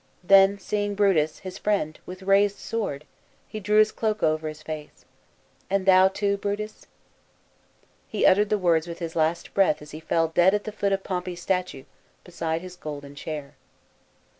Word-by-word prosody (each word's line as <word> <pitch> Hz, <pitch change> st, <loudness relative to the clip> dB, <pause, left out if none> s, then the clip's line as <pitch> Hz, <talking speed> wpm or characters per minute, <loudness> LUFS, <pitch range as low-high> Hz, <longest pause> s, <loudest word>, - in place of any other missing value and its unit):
Then 195 Hz, +2 st, +6 dB
seeing 205 Hz, 0 st, -2 dB
Brutus, 180 Hz, -7 st, +2 dB
his 185 Hz, -, -7 dB
friend, 195 Hz, -7 st, -1 dB
with 185 Hz, +1 st, -9 dB
raised 200 Hz, +1 st, +3 dB
sword, 150 Hz, -11 st, -4 dB, 0.4 s
he 215 Hz, -, -6 dB
drew 210 Hz, +1 st, +1 dB
his 215 Hz, 0 st, +5 dB
cloak 215 Hz, -1 st, -2 dB
over 155 Hz, 0 st, +1 dB
his 155 Hz, 0 st, -8 dB
face, 155 Hz, -1 st, -8 dB, 0.3 s
" -, -, -37 dB
And 195 Hz, -1 st, 0 dB
thou 190 Hz, 0 st, +7 dB
too, 200 Hz, +1 st, -1 dB
Brutus? 205 Hz, +2 st, -5 dB, 0.6 s
" -, -, -37 dB
He -, -, 0 dB
uttered 205 Hz, +2 st, +5 dB
the 210 Hz, -, +2 dB
words 170 Hz, -3 st, +2 dB
with 170 Hz, 0 st, -6 dB
his 165 Hz, -2 st, -6 dB
last 160 Hz, +1 st, 0 dB
breath 190 Hz, -6 st, +3 dB
as 150 Hz, 0 st, -12 dB
he 155 Hz, -, -8 dB
fell 165 Hz, 0 st, 0 dB
dead 175 Hz, +4 st, +4 dB
at 210 Hz, -, -2 dB
the 215 Hz, -, -5 dB
foot 200 Hz, -1 st, -1 dB
of 195 Hz, 0 st, 0 dB
Pompey's 180 Hz, -2 st, -4 dB
statue, 180 Hz, -8 st, -2 dB, 0.4 s
beside 165 Hz, -2 st, -3 dB
his 185 Hz, 0 st, -9 dB
golden 145 Hz, -4 st, -8 dB
chair. 145 Hz, -1 st, -7 dB
185 Hz, 180 wpm, -25 LUFS, 160-200 Hz, 0.6 s, thou